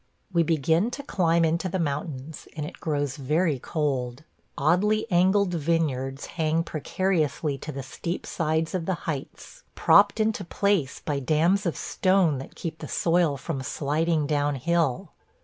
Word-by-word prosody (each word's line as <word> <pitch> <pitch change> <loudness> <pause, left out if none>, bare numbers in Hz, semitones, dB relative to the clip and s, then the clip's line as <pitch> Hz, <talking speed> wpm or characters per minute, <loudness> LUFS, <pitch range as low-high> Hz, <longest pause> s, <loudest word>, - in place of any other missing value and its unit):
We 170 - +4
begin 165 - +2
to 280 - -7
climb 170 -8 +2
into 165 +3 0
the 190 - -1
mountains, 150 -2 -4
and 150 -2 -3
it - - -9
grows 145 -3 -2
very 150 +1 +1
cold. 135 -3 -2 0.3
Oddly 200 +8 +2
angled 185 +2 +3
vineyards 145 -5 -1
hang 160 0 0
precariously 155 -3 -1
to 155 - -6
the 135 -1 -6
steep 170 +6 -5
sides 160 0 -1
of 180 -3 -2
the 190 - +1
heights, 160 - -6
propped 205 +2 +5
into 220 0 +1
place 185 -6 0
by 145 -2 -1
dams 165 +8 +2
of 170 - -2
stone 185 -7 +2
that 135 - -10
keep 160 -1 -5
the - - -6
soil 165 -4 +2
from 135 +1 -4
sliding 150 +3 0
down 145 -1 0
hill. 165 +2 0
160 Hz, 150 wpm, -26 LUFS, 145-175 Hz, 0.3 s, propped